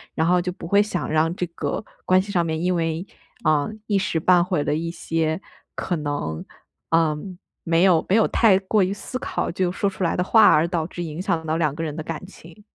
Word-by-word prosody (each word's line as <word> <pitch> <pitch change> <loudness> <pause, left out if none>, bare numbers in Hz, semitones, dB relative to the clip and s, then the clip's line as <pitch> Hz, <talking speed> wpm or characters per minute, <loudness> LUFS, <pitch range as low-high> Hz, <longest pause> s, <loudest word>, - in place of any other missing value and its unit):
然 160 - +1
后 180 0 +3
就 180 +1 -3
不 175 - -10
会 200 +3 +4
想 205 -4 -2
让 160 +2 +2
这 180 - -2
个 155 -1 -4 0.2
关 185 0 +4
系 200 +2 -7
上 175 -3 +2
面 160 -1 -2
因 180 +1 +1
为， 165 +1 -1 0.4
呃， 150 -2 +2 0.2
一 205 - +2
时 185 -4 0
半 175 +2 +4
会 180 0 -1
儿 - - 0
了 - - 0
一 165 +2 -2
些， 165 -1 -1 0.4
可 180 - -2
能， 145 - -3 0.5
呃 165 -2 +3 0.5
没 165 0 +2
有 180 -4 +4
没 190 - +4
有 225 - +4
太 215 -5 +4
过 195 +2 +1
于 185 - 0
思 255 +5 -6
考 - - -2
就 180 0 0
说 200 - -1
出 190 -1 -5
来 170 - +1
的 180 - +2
话， 215 +2 +6
而 155 +2 +5
导 170 -2 -2
致 175 0 -6
影 160 +1 -5
响 170 -5 -1
到 160 0 -1
两 150 -4 0
个 165 - -4
人 150 -2 -4
的 160 - -4
感 165 +2 -6
情。 185 +1 -15
170 Hz, 255 characters per minute, -23 LUFS, 160-185 Hz, 0.5 s, 话